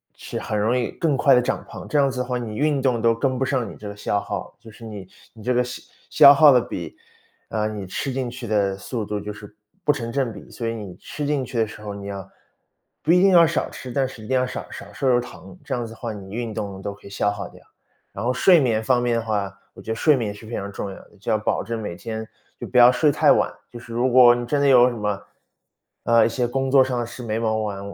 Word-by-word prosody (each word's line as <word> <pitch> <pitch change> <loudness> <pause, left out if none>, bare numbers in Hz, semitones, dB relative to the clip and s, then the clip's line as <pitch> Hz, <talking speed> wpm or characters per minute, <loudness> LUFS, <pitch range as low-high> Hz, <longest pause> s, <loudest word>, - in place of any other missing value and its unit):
是 - - -6
很 105 - -3
容 110 +4 +1
易 120 - -1
更 155 -5 0
快 135 +1 +5
地 125 - +4
长 125 - -2
胖， - - -9
这 150 - +1
样 140 -1 +4
子 130 -1 -5
的 - - -3
话， 125 0 -2
你 115 -3 -5
运 145 +1 +1
动 125 -3 +1
都 115 0 +4
跟 130 +3 -1
不 135 - 0
上 130 -4 -1
你 - - -10
这 105 - -8
个 100 - -8
消 105 0 0
耗， - - -6
就 115 0 -13
是 115 +2 -13
你 105 -4 -8 0.3
你 110 - -13
这 125 +3 +1
个 125 - +3
消 125 +1 -7 0.3
消 140 - +9
耗 145 0 +7
的 125 - +5
比 85 -7 -6 0.5
呃， 110 -1 -1
你 105 -2 -5
吃 130 +8 -4
进 130 -1 -2
去 120 0 -8
的 100 -2 +1
速 110 +3 -4
度， 105 0 -3
就 105 +1 -6
是 105 0 -12 0.3
不 150 - +4
成 125 -6 -4
正 135 -4 0
比。 - - -12
所 120 - -6
以 115 - -1
你 105 -5 -8
吃 150 - -6
进 145 -2 0
去 125 -1 -6
的 110 -1 +2
时 105 0 -11
候， 105 -1 -6
你 100 0 -8
要 100 -1 -6 0.8
不 155 - +2
一 180 +1 +5
定 195 0 +5
要 170 -2 +7
少 165 -1 -1
吃， 130 -2 -9
但 135 +1 +1
是 125 -4 -11
一 - - -10
定 130 - +2
要 130 - 0
少 125 - -6
少 100 - -10
摄 130 +6 0
入 120 -1 +4
糖， 120 -6 -10
这 - - -2
样 120 -1 -3
子 115 - -9
的 115 - -12
话， 115 -2 -4
你 100 -2 -10
运 115 0 -4
动 100 -3 -5
都 100 - -4
可 100 - -19
以 - - -10
消 100 +1 0
耗 100 -1 -5
掉。 - - -17 0.5
然 100 - -5
后 120 - +1
睡 170 +6 +5
眠 115 -5 +1
方 120 +2 +2
面 120 -1 +1
的 - - 0
话， 100 -3 -2 0.2
我 - - -12
觉 - - -5
得 - - -1
睡 150 +6 +4
眠 110 -5 -2
是 105 +2 -13
非 115 - -9
常 100 +1 -4
重 100 0 -5
要 95 - -8
的， - - -16
就 - - -6
要 110 - +3
保 110 - -1
证 115 +2 -4
每 90 -5 -5
天 110 +2 -5 0.3
就 - - -6
不 125 - -2
要 120 0 +9
睡 130 +4 +3
太 - - +5
晚， - - +1 0.2
就 120 - -10
是 120 0 -12
如 120 +2 +1
果 125 -1 +8
你 120 0 -3
真 140 +4 0
的 140 - +3
有 125 -2 +7
什 125 - -2
么 105 -2 -2 0.8
呃， 115 0 +5
一 - - +2
些 120 +1 -1
工 135 +2 -1
作 135 -1 +7
上 130 -1 0
的 120 - -1
事 120 +2 -9
没 110 -2 -2
忙 110 -1 0
完， 105 -2 -3
115 Hz, 310 characters per minute, -23 LUFS, 105-130 Hz, 0.8 s, 消